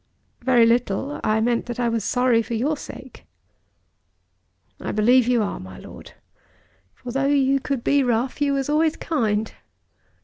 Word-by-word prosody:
"Very 240 Hz, -2 st, +4 dB
little. 240 Hz, +4 st, 0 dB
I 215 Hz, +1 st, +1 dB
meant 235 Hz, +1 st, 0 dB
that 240 Hz, 0 st, -5 dB
I 240 Hz, -, +1 dB
was 230 Hz, -2 st, -1 dB
sorry 250 Hz, -1 st, +2 dB
for 230 Hz, +1 st, -5 dB
your 280 Hz, +7 st, 0 dB
sake." 260 Hz, -, -11 dB, 1.5 s
"I -, -, -4 dB
believe 240 Hz, +3 st, +3 dB
you 245 Hz, -3 st, +2 dB
are, 200 Hz, -, -4 dB
my 95 Hz, 0 st, -10 dB
Lord. -, -, -12 dB, 0.8 s
For 245 Hz, -, -8 dB
though 270 Hz, +2 st, 0 dB
you 275 Hz, -1 st, +2 dB
could 270 Hz, -2 st, -3 dB
be 285 Hz, 0 st, +3 dB
rough 245 Hz, +2 st, -1 dB
you 285 Hz, -1 st, +2 dB
was 275 Hz, -1 st, -1 dB
always 310 Hz, +1 st, +2 dB
kind. 220 Hz, -8 st, -1 dB
245 Hz, 160 wpm, -22 LUFS, 230-275 Hz, 1.5 s, Very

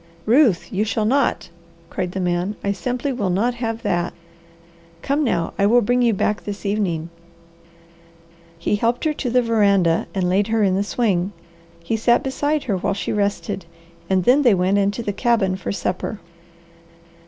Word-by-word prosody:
"Ruth, 230 Hz, -, +3 dB
you 195 Hz, +2 st, +1 dB
shall 220 Hz, 0 st, -1 dB
not!" 270 Hz, +4 st, +1 dB, 0.4 s
cried 180 Hz, -1 st, -3 dB
the 190 Hz, -, -3 dB
man. 180 Hz, +3 st, -1 dB
"I 200 Hz, -, +1 dB
simply 250 Hz, +6 st, -2 dB
will 205 Hz, -7 st, -1 dB
not 215 Hz, +7 st, +1 dB
have 230 Hz, -1 st, -4 dB
that. 175 Hz, -4 st, -1 dB, 0.9 s
Come 285 Hz, +2 st, +1 dB
now, 170 Hz, -, -1 dB
I 200 Hz, -, +4 dB
will 240 Hz, +3 st, +5 dB
bring 245 Hz, +4 st, +2 dB
you 235 Hz, -1 st, +4 dB
back 210 Hz, 0 st, -1 dB
this 205 Hz, 0 st, -7 dB
evening." 180 Hz, -6 st, -1 dB, 1.5 s
He 170 Hz, +5 st, 0 dB
helped 235 Hz, +3 st, 0 dB
her 310 Hz, -, +2 dB
to 270 Hz, -4 st, -3 dB
the 250 Hz, +1 st, +3 dB
veranda 200 Hz, -7 st, +2 dB
and 185 Hz, -2 st, 0 dB
laid 195 Hz, +3 st, +2 dB
her 225 Hz, -1 st, +1 dB
in 190 Hz, -2 st, +3 dB
the 195 Hz, -, +1 dB
swing. 205 Hz, -4 st, 0 dB, 0.5 s
He 220 Hz, -, -1 dB
sat 235 Hz, +2 st, +3 dB
beside 290 Hz, +3 st, -1 dB
her 205 Hz, -6 st, -1 dB
while 195 Hz, +2 st, -1 dB
she 200 Hz, -, -3 dB
rested, 200 Hz, -2 st, -2 dB, 0.4 s
and 190 Hz, -1 st, +2 dB
then 255 Hz, +8 st, +5 dB
they 240 Hz, -7 st, +5 dB
went 185 Hz, +2 st, +2 dB
into 200 Hz, +4 st, 0 dB
the 205 Hz, -, -2 dB
cabin 210 Hz, -4 st, +1 dB
for 190 Hz, -, -4 dB
supper. 195 Hz, +2 st, -3 dB
205 Hz, 175 wpm, -21 LUFS, 190-240 Hz, 1.5 s, will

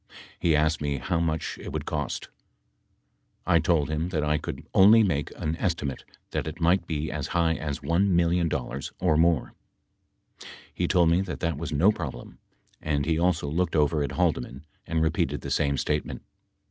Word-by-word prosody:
He 80 Hz, -3 st, +3 dB
asked 75 Hz, +1 st, +1 dB
me 70 Hz, -1 st, -1 dB
how 80 Hz, +7 st, -1 dB
much 80 Hz, -2 st, -2 dB
it -, -, -7 dB
would -, -, -4 dB
cost. 75 Hz, -3 st, -3 dB, 1.2 s
I -, -, +4 dB
told 80 Hz, -5 st, +2 dB
him 75 Hz, +3 st, -2 dB
that 80 Hz, -4 st, -1 dB
I 75 Hz, 0 st, +1 dB
could -, -, -6 dB
only 110 Hz, +4 st, +7 dB
make 75 Hz, -8 st, 0 dB
an 80 Hz, +1 st, -2 dB
estimate 75 Hz, -7 st, -2 dB, 0.3 s
that -, -, -2 dB
it 80 Hz, +3 st, -6 dB
might 85 Hz, +1 st, +2 dB
be 75 Hz, -1 st, -2 dB
as -, -, -3 dB
high 85 Hz, -1 st, +3 dB
as 75 Hz, -3 st, -4 dB
$1 85 Hz, +4 st, +2 dB
million 85 Hz, -2 st, +2 dB, 0.5 s
or 90 Hz, -4 st, +2 dB
more. 80 Hz, -3 st, +2 dB, 1.2 s
He 90 Hz, -, -1 dB
told 85 Hz, -3 st, +4 dB
me 85 Hz, +3 st, +3 dB
that 95 Hz, -, -5 dB
that 85 Hz, -2 st, 0 dB
was 80 Hz, 0 st, -4 dB
no 80 Hz, +8 st, +4 dB
problem, 85 Hz, -11 st, -7 dB, 0.4 s
and 75 Hz, -2 st, -1 dB
he 80 Hz, 0 st, +1 dB
also 85 Hz, -3 st, +1 dB
looked 85 Hz, +3 st, -1 dB
over 75 Hz, 0 st, +2 dB
at 70 Hz, -, -2 dB
Haldeman 80 Hz, -5 st, -1 dB, 0.2 s
and 80 Hz, -1 st, 0 dB
repeated 80 Hz, -, 0 dB
the -, -, -6 dB
same 70 Hz, -2 st, +1 dB
statement. 75 Hz, +3 st, -2 dB
80 Hz, 175 wpm, -26 LUFS, 75-85 Hz, 1.2 s, only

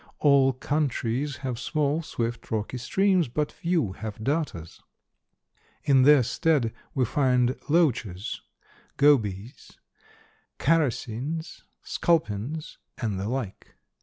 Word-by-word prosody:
All 140 Hz, -2 st, +5 dB
countries 135 Hz, -1 st, -1 dB
have 125 Hz, -2 st, -3 dB
small, 150 Hz, +4 st, 0 dB
swift, 120 Hz, -6 st, -4 dB
rocky 110 Hz, +3 st, -3 dB
streams, 185 Hz, +6 st, +2 dB
but 150 Hz, +5 st, -2 dB
few 170 Hz, -, -1 dB
have 110 Hz, +2 st, -7 dB
darters. 140 Hz, -, -3 dB, 1.0 s
In 135 Hz, -3 st, +4 dB
their 140 Hz, 0 st, +6 dB
stead 125 Hz, -1 st, +1 dB, 0.2 s
we 130 Hz, -2 st, +2 dB
find 125 Hz, -1 st, +2 dB
loaches, 120 Hz, -, 0 dB, 0.6 s
gobies, 115 Hz, -6 st, +1 dB, 0.8 s
characins, 150 Hz, 0 st, -1 dB, 0.2 s
sculpins, 155 Hz, -2 st, -1 dB, 0.2 s
and 105 Hz, -6 st, -2 dB
the 100 Hz, +3 st, -3 dB
like. 125 Hz, -6 st, -5 dB
130 Hz, 100 wpm, -26 LUFS, 115-150 Hz, 1.0 s, their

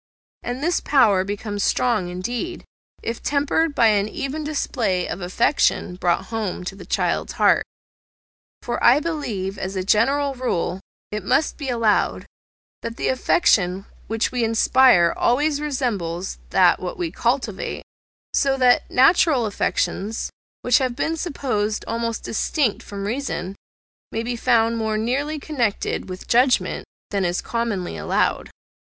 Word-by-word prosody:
And 245 Hz, +3 st, -4 dB
this 345 Hz, +2 st, +2 dB
power 220 Hz, -10 st, +3 dB
becomes 205 Hz, +1 st, -4 dB
strong 215 Hz, -5 st, +1 dB
indeed, 240 Hz, -, -4 dB, 0.4 s
if 230 Hz, 0 st, -4 dB
tempered 290 Hz, +2 st, +1 dB
by 235 Hz, -, +4 dB
an 205 Hz, 0 st, +2 dB
even 295 Hz, +3 st, -4 dB
display 240 Hz, -11 st, -1 dB
of -, -, -5 dB
affection 180 Hz, 0 st, +1 dB
brought 175 Hz, -1 st, 0 dB
home 210 Hz, -5 st, -3 dB
to 180 Hz, -, -5 dB
the 200 Hz, -, -12 dB
child's -, -, -1 dB
heart. -, -, +3 dB, 1.0 s
For, 240 Hz, -, -3 dB
I 245 Hz, +4 st, +7 dB
believe, 225 Hz, -, -3 dB
as 190 Hz, +1 st, -4 dB
a 185 Hz, -, -1 dB
general 270 Hz, +8 st, +2 dB
rule, 195 Hz, -8 st, -2 dB, 0.3 s
it 210 Hz, -1 st, -4 dB
must 275 Hz, +10 st, +1 dB
be 280 Hz, -4 st, -5 dB
allowed, 230 Hz, -4 st, +1 dB, 0.6 s
that 230 Hz, 0 st, -6 dB
the -, -, -1 dB
affection 195 Hz, -, +2 dB, 0.2 s
which 225 Hz, +1 st, -1 dB
we 250 Hz, -2 st, -1 dB
inspire 225 Hz, -5 st, +4 dB
always 290 Hz, +4 st, +1 dB
resembles 200 Hz, -, -2 dB
that -, -, +4 dB, 0.2 s
we 170 Hz, -2 st, -2 dB
cultivate; 235 Hz, -1 st, -2 dB, 0.5 s
so 275 Hz, -2 st, +2 dB
that 250 Hz, -1 st, +3 dB
natural 270 Hz, -1 st, +4 dB
affections, 210 Hz, +1 st, -2 dB, 0.3 s
which 245 Hz, +2 st, +4 dB
have 255 Hz, -2 st, -1 dB
been 320 Hz, +4 st, -1 dB
supposed 250 Hz, -, -2 dB
almost 230 Hz, 0 st, -2 dB
distinct 240 Hz, +1 st, 0 dB
from 200 Hz, -1 st, -6 dB
reason, 210 Hz, -5 st, -3 dB, 0.6 s
may 225 Hz, -, -2 dB
be 240 Hz, +1 st, -2 dB
found 230 Hz, -1 st, +2 dB
more 220 Hz, -1 st, -1 dB
nearly 275 Hz, +8 st, -1 dB
connected 250 Hz, -11 st, -2 dB
with 185 Hz, 0 st, -8 dB
judgment 250 Hz, +2 st, +2 dB, 0.3 s
than 200 Hz, -2 st, 0 dB
is 175 Hz, 0 st, 0 dB
commonly 230 Hz, -6 st, -3 dB
allowed. -, -, 0 dB
230 Hz, 135 wpm, -22 LUFS, 200-270 Hz, 1.0 s, I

